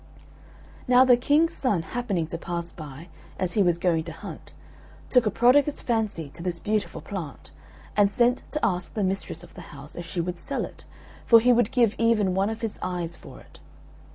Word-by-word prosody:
Now 250 +1 +6
the 250 -1 +7
King's 295 +7 +2
son 205 -11 0
happening 205 -6 -2
to 165 +1 -5
pass 170 0 -4
by, 155 +2 -10 0.3
as 185 -1 -1
he 210 - +2
was 175 -3 +3
going 170 -2 +1
to 170 - -6
hunt, - - -10 0.6
took 250 -4 +4
a - - +4
prodigious 260 +7 +3
fancy 215 - -1
to - - -12
this 175 -1 -1
beautiful 210 +3 -2
plant, 170 -9 -7 0.4
and 205 -1 +4
sent 240 +4 +2
to 300 - -1
ask 180 -3 -1
the 210 - 0
mistress 190 -3 -2
of - - -14
the 180 - -10 0.2
house 140 +2 -8
if 175 0 -6
she 175 - -4
would 175 0 -3
sell 275 +10 -2
it, - - -13 0.4
for 230 - +7
he 245 +2 +4
would 235 -2 +3
give 235 -4 +3
even 220 -5 +2
one 195 +2 +1
of 225 0 -5
his 225 -2 -3
eyes 175 -2 -3
for - - -13
it. - - -18
200 Hz, 200 wpm, -25 LUFS, 170-240 Hz, 0.6 s, the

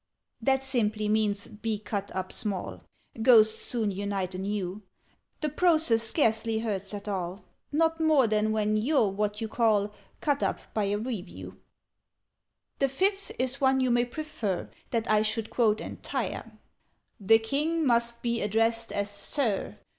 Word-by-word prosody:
"That 265 +3 +2
simply 215 -5 0
means 210 -1 +1
'be 215 0 -3
cut 200 -1 -4
up 185 0 -3
small': 200 -4 -4 0.4
Ghosts 220 -2 +6
soon 225 -4 0
unite 195 -1 -3
anew: 195 +1 -3 0.6
The 305 - 0
process 315 -8 +3
scarcely 225 -2 +1
hurts 200 -4 -3
at 200 +1 -8
all 190 -1 -3 0.3
Not 325 +2 +2
more 310 -5 +4
than 215 0 +1
when 215 0 +1
you're 235 -1 +2
what 210 +2 -2
you 225 - -1
call 210 -2 +2 0.3
'Cut 285 -2 0
up' - - -3
by 215 -2 +1
a 200 +1 0
Review. 215 -5 -6 1.2
"The 275 - +2
Fifth 390 +8 0
is 260 +3 -1
one 265 0 +4
you 255 -1 +2
may 240 0 +3
prefer 240 - -4 0.2
That 230 -1 -1
I 215 -1 +4
should 220 0 -1
quote 220 -3 +2
entire: - - -4 0.7
_The 225 +3 +5
King 305 +7 0
must 235 -1 +1
be 235 -1 0
addressed 225 +2 +1
as 205 0 -1
'Sir.' 205 - -1
220 Hz, 145 wpm, -28 LUFS, 205-255 Hz, 1.2 s, Ghosts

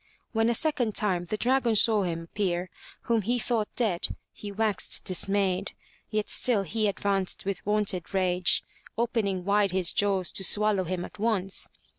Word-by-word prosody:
When 225 0 +2
a 235 - +2
second 255 -7 0
time 185 -5 +1
the 215 - -3
dragon 245 -1 +2
saw 215 0 +4
him 170 -3 -2
appear 180 0 -2 0.3
whom 230 -2 +1
he 240 +5 0
thought 230 -3 0
dead, 205 -8 0 0.3
he 205 - -8
waxed 215 0 -1
dismayed. 195 +1 +1 0.4
Yet 215 -1 -1
still 225 -6 +1
he 215 +4 -1
advanced 195 -1 -1
with 195 -1 -3
wonted 210 -4 0
rage, 185 -2 +2 0.3
opening 220 -6 -1
wide 200 -1 +2
his 185 -2 +2
jaws 195 -3 +2
to 190 - +2
swallow 205 -1 +2
him 180 0 -3
at - - -13
once. 200 -4 +1
200 Hz, 160 wpm, -27 LUFS, 185-220 Hz, 0.4 s, saw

